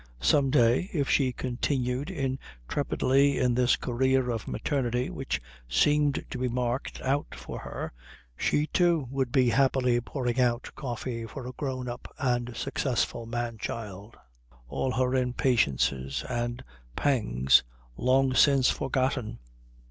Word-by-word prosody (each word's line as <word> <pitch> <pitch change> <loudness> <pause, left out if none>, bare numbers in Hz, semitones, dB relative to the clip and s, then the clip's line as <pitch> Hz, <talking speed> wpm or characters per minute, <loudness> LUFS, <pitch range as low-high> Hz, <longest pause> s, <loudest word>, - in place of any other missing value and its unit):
Some 140 -3 +4
day, 125 - +3
if 145 -5 0
she 130 -3 +3
continued 125 +3 -2
intrepidly 135 - 0
in 125 -1 +2
this 125 0 +3
career 130 +1 +1
of 115 -2 -4
maternity 125 -3 -1
which 135 - -3 0.3
seemed 145 - +2
to 125 - -4
be 130 - 0
marked 125 +1 -2
out 140 +2 -1
for - - -7
her, - - -6 0.4
she, 150 - +1
too, 170 -4 +2
would 135 -3 -1
be 125 -2 +4
happily 125 -1 +2
pouring 125 0 -2
out 120 -1 0
coffee 120 -3 -4
for 130 +2 -8
a 125 - -5
grown 130 -2 -4
up 120 0 -7
and 120 -2 -1
successful 120 -3 -1
man 120 -1 -3
child, 105 -1 -6 0.5
all 130 - -1
her 130 0 +1
impatiences 90 - +1
and 120 -1 -3 0.3
pangs 70 - +3 0.3
long 130 - +2
since 135 -1 +5
forgotten. 130 -3 -1
125 Hz, 130 wpm, -28 LUFS, 120-135 Hz, 0.5 s, since